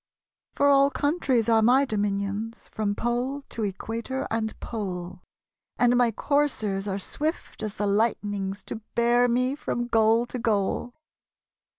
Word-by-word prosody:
For 285 Hz, -, +3 dB
all 280 Hz, 0 st, +6 dB
countries 285 Hz, -6 st, +1 dB
are 225 Hz, -1 st, +4 dB
my 255 Hz, +5 st, +5 dB
dominionSj 205 Hz, 0 st, -2 dB
From 205 Hz, -2 st, -2 dB
pole 245 Hz, +5 st, -1 dB
to 230 Hz, -, -5 dB
equator 225 Hz, +6 st, -3 dB
and 220 Hz, -1 st, -2 dB
pole; 185 Hz, -5 st, -5 dB, 0.6 s
And 245 Hz, 0 st, +4 dB
my 245 Hz, -1 st, +4 dB
coursers 220 Hz, -7 st, 0 dB
are 195 Hz, -1 st, -1 dB
swift 305 Hz, -, -4 dB
as 215 Hz, -1 st, -4 dB
the 205 Hz, -, -1 dB
light'nings 205 Hz, -2 st, 0 dB
To -, -, -6 dB, 0.2 s
bear 240 Hz, +1 st, +4 dB
me 255 Hz, +2 st, +1 dB
from 245 Hz, -4 st, -3 dB
goal 225 Hz, 0 st, +3 dB
to 250 Hz, -, -6 dB
goal. 225 Hz, +2 st, 0 dB
230 Hz, 135 wpm, -26 LUFS, 205-250 Hz, 0.6 s, all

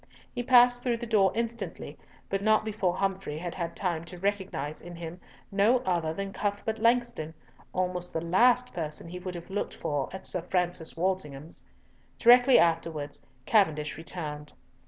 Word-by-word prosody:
He 245 Hz, -, -2 dB
passed 245 Hz, -1 st, +6 dB
through 240 Hz, -2 st, 0 dB
the 235 Hz, -, -5 dB
door 205 Hz, -5 st, +3 dB
instantly, 230 Hz, 0 st, -4 dB, 0.3 s
but 195 Hz, 0 st, -1 dB
not 215 Hz, +1 st, +3 dB
before 205 Hz, -5 st, 0 dB
Humfrey 195 Hz, -5 st, -2 dB
had 175 Hz, +1 st, -5 dB
had 170 Hz, -2 st, -4 dB
time 170 Hz, -4 st, -1 dB
to 180 Hz, +1 st, -9 dB
recognise 190 Hz, -6 st, -2 dB
in 175 Hz, 0 st, -9 dB
him 170 Hz, +1 st, -8 dB, 0.3 s
no 205 Hz, +5 st, +4 dB
other 170 Hz, -6 st, 0 dB
than 195 Hz, +4 st, -5 dB
Cuthbert 205 Hz, +2 st, -2 dB
Langston, 235 Hz, -9 st, +1 dB, 0.4 s
almost 180 Hz, -1 st, -2 dB
the -, -, -2 dB
last 245 Hz, +8 st, +4 dB
person 160 Hz, -1 st, -4 dB
he 180 Hz, +2 st, -7 dB
would 180 Hz, 0 st, -6 dB
have 175 Hz, +2 st, -9 dB
looked 205 Hz, -, -3 dB
for 145 Hz, -4 st, -2 dB
at 190 Hz, -, -8 dB
Sir 180 Hz, -, 0 dB
Francis 175 Hz, -2 st, -2 dB
Walsingham's. 165 Hz, -5 st, -3 dB, 0.5 s
Directly 245 Hz, +2 st, +7 dB
afterwards 160 Hz, -4 st, 0 dB, 0.2 s
Cavendish 155 Hz, -9 st, +2 dB
returned. 150 Hz, -2 st, -6 dB
185 Hz, 155 wpm, -28 LUFS, 165-215 Hz, 0.5 s, Directly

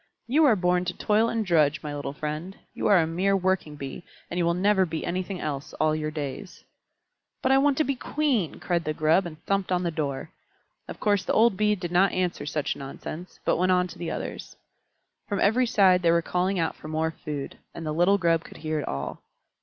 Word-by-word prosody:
You 300 Hz, +6 st, +4 dB
are 250 Hz, -6 st, +6 dB
born 180 Hz, -1 st, +1 dB
to 180 Hz, -, -4 dB
toil 215 Hz, +2 st, +2 dB
and 225 Hz, -2 st, -1 dB
drudge, 155 Hz, -4 st, +2 dB
my 150 Hz, -1 st, -4 dB
little 145 Hz, -1 st, -4 dB
friend. 155 Hz, +6 st, -5 dB, 0.2 s
You -, -, -1 dB
are 205 Hz, -2 st, +6 dB
a 165 Hz, -, +4 dB
mere 185 Hz, +5 st, +1 dB
working 185 Hz, -5 st, 0 dB
Bee, 140 Hz, +3 st, -7 dB, 0.3 s
and 175 Hz, -, -2 dB
you 175 Hz, -, +2 dB
will 170 Hz, 0 st, +2 dB
never 195 Hz, +1 st, +3 dB
be 160 Hz, -3 st, -3 dB
anything 185 Hz, +1 st, -3 dB
else 145 Hz, -3 st, -4 dB
all 155 Hz, 0 st, +1 dB
your 155 Hz, 0 st, -2 dB
days." 155 Hz, +5 st, -6 dB, 0.8 s
"But 260 Hz, -, +3 dB
I 270 Hz, -, +6 dB
want 280 Hz, -1 st, +3 dB
to 310 Hz, -, +3 dB
be 275 Hz, -, 0 dB
Queen!" 255 Hz, -, -1 dB
cried 175 Hz, -2 st, 0 dB
the 155 Hz, 0 st, -2 dB
Grub, 160 Hz, +5 st, +3 dB
and 155 Hz, -2 st, -10 dB
thumped 195 Hz, -1 st, 0 dB
on 180 Hz, 0 st, +1 dB
the 170 Hz, -, 0 dB
door. 145 Hz, -2 st, -3 dB, 0.6 s
Of -, -, -8 dB
course 205 Hz, -3 st, +2 dB
the -, -, -1 dB
old 225 Hz, -2 st, +4 dB
Bee 210 Hz, +1 st, +2 dB
did 175 Hz, -3 st, -5 dB
not 185 Hz, +3 st, +4 dB
answer 180 Hz, -4 st, -1 dB
such 150 Hz, -1 st, -1 dB
nonsense, 155 Hz, +5 st, -8 dB
but -, -, +2 dB
went 185 Hz, +2 st, +3 dB
on 180 Hz, 0 st, +3 dB
to 170 Hz, +1 st, -11 dB
the 170 Hz, -2 st, -3 dB
others. -, -, -6 dB, 0.7 s
From 200 Hz, -, -2 dB
every 245 Hz, +5 st, +3 dB
side 190 Hz, -5 st, +4 dB
they 170 Hz, -, +3 dB
were 170 Hz, 0 st, +3 dB
calling 185 Hz, +3 st, 0 dB
out 165 Hz, -2 st, 0 dB
for -, -, -11 dB
more 160 Hz, +1 st, -1 dB
food, 150 Hz, -3 st, -6 dB, 0.2 s
and 165 Hz, -, -6 dB
the 155 Hz, -, -2 dB
little 175 Hz, +5 st, +4 dB
Grub 165 Hz, -3 st, +2 dB
could -, -, -12 dB
hear 155 Hz, -1 st, -2 dB
it 145 Hz, -, -4 dB
all. 70 Hz, 0 st, -4 dB
175 Hz, 225 wpm, -26 LUFS, 155-195 Hz, 0.8 s, are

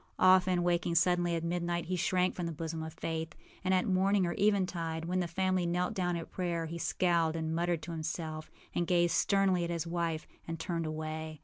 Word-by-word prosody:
Often, 185 Hz, -1 st, +5 dB
waking 175 Hz, -1 st, +1 dB
suddenly 175 Hz, 0 st, +3 dB
at 165 Hz, -, -2 dB
midnight, 170 Hz, 0 st, -1 dB
he 185 Hz, +2 st, -1 dB
shrank 180 Hz, +1 st, +1 dB
from 175 Hz, -2 st, -3 dB
the -, -, -3 dB
bosom 160 Hz, +1 st, -4 dB
of 160 Hz, 0 st, -6 dB
Faith; 160 Hz, -1 st, -4 dB, 0.3 s
and 185 Hz, -, +1 dB
at 185 Hz, -1 st, +3 dB
morning 195 Hz, +1 st, +3 dB
or 170 Hz, -, -1 dB
eventide, 180 Hz, -5 st, 0 dB
when 180 Hz, +2 st, 0 dB
the 175 Hz, -, 0 dB
family 185 Hz, +1 st, 0 dB
knelt 180 Hz, +1 st, 0 dB
down 180 Hz, -2 st, 0 dB
at 165 Hz, -1 st, -6 dB
prayer, 170 Hz, -3 st, -2 dB
he 170 Hz, +1 st, -5 dB
scowled 170 Hz, -2 st, +1 dB
and 160 Hz, -1 st, -2 dB
muttered 170 Hz, 0 st, 0 dB
to 170 Hz, -, -6 dB
himself, 160 Hz, -1 st, -4 dB, 0.2 s
and 175 Hz, -, 0 dB
gazed 175 Hz, -1 st, +3 dB
sternly 195 Hz, -3 st, +3 dB
at 170 Hz, -, -2 dB
his 170 Hz, -1 st, -2 dB
wife, 170 Hz, -2 st, -2 dB, 0.2 s
and 165 Hz, 0 st, -4 dB
turned 165 Hz, -1 st, -2 dB
away. 155 Hz, 0 st, -5 dB
170 Hz, 205 wpm, -32 LUFS, 165-180 Hz, 0.3 s, Often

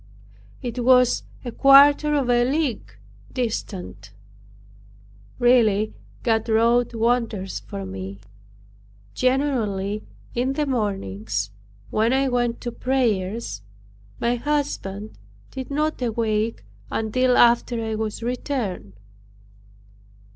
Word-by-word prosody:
It 245 Hz, 0 st, -3 dB
was 250 Hz, 0 st, +5 dB, 0.2 s
a 240 Hz, -, -3 dB
quarter 285 Hz, +3 st, +6 dB
of 275 Hz, -4 st, +1 dB
a 240 Hz, 0 st, +3 dB
league 255 Hz, -, -1 dB, 0.4 s
distant. 215 Hz, -, -4 dB, 1.3 s
Really 220 Hz, -4 st, +3 dB, 0.3 s
God 225 Hz, -1 st, +1 dB
wrought 235 Hz, +2 st, +3 dB
wonders 225 Hz, -, 0 dB
for 100 Hz, -1 st, -7 dB
me. 95 Hz, +1 st, -7 dB, 0.9 s
Generally, 225 Hz, -7 st, 0 dB, 0.3 s
in 255 Hz, +3 st, 0 dB
the 295 Hz, +2 st, 0 dB
mornings 110 Hz, -, -2 dB, 0.4 s
when 225 Hz, +3 st, +2 dB
I 270 Hz, 0 st, +2 dB
went 240 Hz, -1 st, 0 dB
to 240 Hz, -, -4 dB
prayers, 225 Hz, -, -1 dB, 0.6 s
my 240 Hz, +1 st, +1 dB
husband 235 Hz, -7 st, -3 dB, 0.3 s
did 260 Hz, -1 st, -6 dB
not 305 Hz, 0 st, -1 dB
awake 225 Hz, -2 st, -1 dB, 0.3 s
until 250 Hz, +3 st, +1 dB
after 235 Hz, 0 st, +4 dB
I 220 Hz, -, -2 dB
was 220 Hz, +1 st, -3 dB
returned. 235 Hz, -, -3 dB
235 Hz, 95 wpm, -23 LUFS, 210-255 Hz, 1.3 s, quarter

